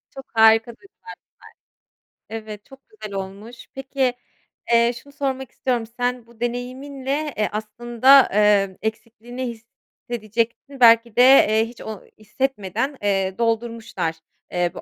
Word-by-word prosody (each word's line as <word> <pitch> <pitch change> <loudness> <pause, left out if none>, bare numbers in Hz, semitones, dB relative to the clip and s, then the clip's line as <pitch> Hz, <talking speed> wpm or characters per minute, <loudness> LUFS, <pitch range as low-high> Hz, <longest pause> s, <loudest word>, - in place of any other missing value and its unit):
Çok 270 0 -9
harika 225 +1 +5
duygular 390 - -19 1.2
bunlar. 225 0 -4
Evet, 210 -1 -10
çok 270 - -16
güzel 215 - -9
olmuş. 200 +5 -8
Peki, 270 -1 -1 0.6
eee, 235 +1 +4
şunu 285 0 -18
sormak 265 -3 -3
istiyorum. 245 -3 -2
Sen 245 -1 -1
bu 235 -1 -21
deneyiminle, 265 +4 -4
eee, 210 - 0
aslında, 240 +5 +4
ııı, 200 -2 +3
eksikliğini 230 +3 -5
hissedecektin 235 +2 -5
belki 230 -1 +6
de, 245 - +5
eee, 225 -4 +6
hiç 235 +1 -12
o 215 -3 -7 0.2
hissetmeden, 240 +3 -3
eee, 195 -2 0
doldurmuşlar, 230 -7 -2 0.4
eee, 175 -1 0
bu - - -9
235 Hz, 125 wpm, -22 LUFS, 215-260 Hz, 1.2 s, belki